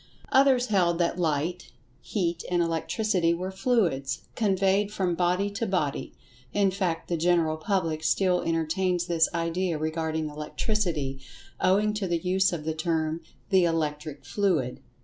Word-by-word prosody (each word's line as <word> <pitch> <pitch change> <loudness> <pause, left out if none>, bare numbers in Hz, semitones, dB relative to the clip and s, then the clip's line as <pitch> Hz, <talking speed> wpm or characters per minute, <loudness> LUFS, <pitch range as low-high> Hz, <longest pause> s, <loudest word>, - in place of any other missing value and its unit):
Others 265 -2 +5
held 175 -5 +2
that 175 +1 0
Light, 165 +2 -1 0.3
Heat 175 -5 -2
and 175 -1 +1
Electricity 170 +1 0
were 185 +2 -4
"fluids" 190 - 0
conveyed 195 -1 +2
from 185 -4 0
body 180 +3 +1
to 205 +3 -2
body—in 180 +1 -2
fact 185 -3 -2
the 175 - 0
general 165 -1 +2
public 160 -2 -1
still 180 +2 +2
entertains 170 +2 0
this 165 -2 +2
idea 170 0 -1
regarding 160 0 -2
Electricity, 150 -2 -2 0.4
owing 205 +3 +3
to 210 -2 -2
the 170 -1 +1
use 185 +3 +1
of 165 -3 -4
the 160 +1 -2
term 160 0 -1 0.3
"the 190 -2 +5
Electric 155 -3 -2
fluid." 170 -12 0
175 Hz, 135 wpm, -27 LUFS, 160-190 Hz, 0.4 s, Others